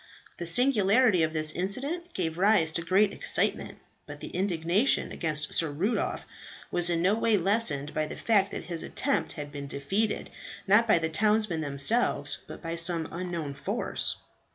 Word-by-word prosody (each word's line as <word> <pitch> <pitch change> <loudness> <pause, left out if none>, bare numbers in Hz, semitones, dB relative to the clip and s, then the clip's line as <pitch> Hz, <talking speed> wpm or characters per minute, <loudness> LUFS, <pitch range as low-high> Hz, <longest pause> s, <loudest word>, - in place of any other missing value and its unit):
The 170 - -3
singularity 220 -1 +3
of 160 0 +1
this 155 -1 +2
incident 280 - -4
gave 165 -2 -3
rise 190 -5 +3
to 170 - -2
great 195 +4 +2
excitement; - - -1 0.3
but - - -9
the - - -8
indignation 185 +5 0
against 150 -3 -2
Sir 165 - +3
Rudolph 180 +11 -2 0.5
was 175 0 +2
in 170 -1 0
no 190 +3 +3
way 220 -1 +2
lessened 175 -7 +1
by 155 0 -1
the - - -8
fact 200 -3 +2
that - - -6
his 170 -2 -5
attempt 280 0 -1
had 145 -1 -7
been 140 -1 -7
defeated, 195 +11 -2 0.3
not 210 +4 +4
by 215 - +5
the 165 -1 -1
townsmen 210 0 +1
themselves, 145 - 0
but - - -10
by 165 0 -4
some 170 -1 +2
unknown 170 -4 -4
force. 140 - -1
175 Hz, 165 wpm, -28 LUFS, 160-210 Hz, 0.5 s, by